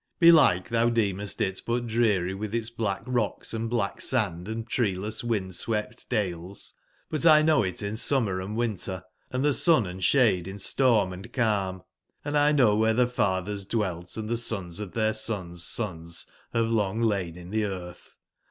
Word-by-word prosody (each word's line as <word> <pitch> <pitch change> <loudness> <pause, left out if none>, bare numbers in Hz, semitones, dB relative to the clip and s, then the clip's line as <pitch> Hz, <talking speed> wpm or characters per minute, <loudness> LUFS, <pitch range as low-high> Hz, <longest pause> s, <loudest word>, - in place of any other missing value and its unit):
Belike 155 - +6
thou 115 0 +2
decmest 105 -4 -1
it 95 -1 -1
but 120 +1 -1
dreary 110 -6 +1
with 105 +3 -4
its 115 0 -1
black 110 -4 -2
rocks 120 -5 -2
and 115 0 -2
black 115 -4 -1
sand, 95 -8 -1
and 110 +1 -4
treeless 105 -2 -1
wind/ 105 -6 -2
swept 105 +4 -3
dales; 95 -2 -2 0.4
butl 155 0 +5
know 155 -1 +4
it 95 0 -3
in 100 +1 -3
summer 110 -6 +1
and 105 +4 -5
winter, 100 -5 -2 0.3
and 130 +2 -1
sun 155 - +3
and 90 +1 -6
shade, 100 -6 +3
in 95 +1 -6
storm 105 -2 +3
and 95 +2 -10
calm. 100 -6 0 0.4
Hnd 145 0 -2
I 145 0 +4
know 125 -8 +4
where 110 +1 +2
the 125 +1 +4
fathers 100 -4 -1
dwelt 95 -4 -3
and 110 -1 -4
the 120 +1 0
sons 100 -7 -2
of 105 -4 -6
their 110 -1 +1
sons' 95 -6 -2
sons 85 -6 -3 0.3
have 115 -1 0
long 110 -1 0
lain 95 -6 0
in 90 +1 -10
the 110 0 +1
earth. 90 -3 -8
105 Hz, 170 wpm, -27 LUFS, 95-115 Hz, 0.4 s, Belike